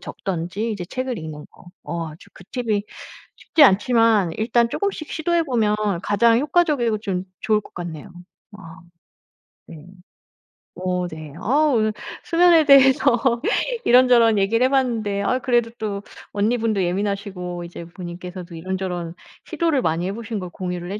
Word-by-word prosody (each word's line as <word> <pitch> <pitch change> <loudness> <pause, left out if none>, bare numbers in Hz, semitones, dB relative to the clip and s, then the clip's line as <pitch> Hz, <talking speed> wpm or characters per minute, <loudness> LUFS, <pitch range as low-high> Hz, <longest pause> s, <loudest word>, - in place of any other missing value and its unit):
적든지 190 +5 -4
이제 185 -4 -5
책을 255 +3 -4
읽는 155 -1 -8
거. - - -19 0.2
어 170 -1 -4
아주 155 +2 -14
그 185 - -14
팁이 225 -5 -1 0.5
쉽지 315 - +2
않지만 225 -3 +3
일단 235 +1 +2
쪼금씩 390 - -3
시도해 340 +1 0
보면 225 -6 +1 0.3
가장 230 +3 +3
효과적이고 280 -6 +1
좀 190 -3 -3 0.2
좋을 215 -1 +1
것 - - -17
같네요. 170 -1 -7 0.5
아 165 -4 -12 0.9
네. 155 -2 -12 0.9
어 180 -1 -2
네. 155 -3 -9
아 290 +8 +2
오늘 215 -2 +2 0.3
수면에 335 -2 +4
대해서 265 -3 +4 0.4
이런저런 240 -3 +5
얘기를 220 +5 +2
해 260 - +2
봤는데 225 -7 0
아유 255 +5 +1
그래도 240 -2 +1
또 205 -2 -4 0.3
언니분도 215 -1 0
예민하시고 185 -1 -3
이제 170 0 -9
본인께서도 175 0 -9
이런저런 180 -1 -4 0.3
시도를 325 -6 0
많이 165 0 -1
해 - - -2
보신 225 0 -5
걸 180 -2 -6
공유를 180 -1 -5
해 205 - -4
210 Hz, 310 characters per minute, -22 LUFS, 180-245 Hz, 0.9 s, 이런저런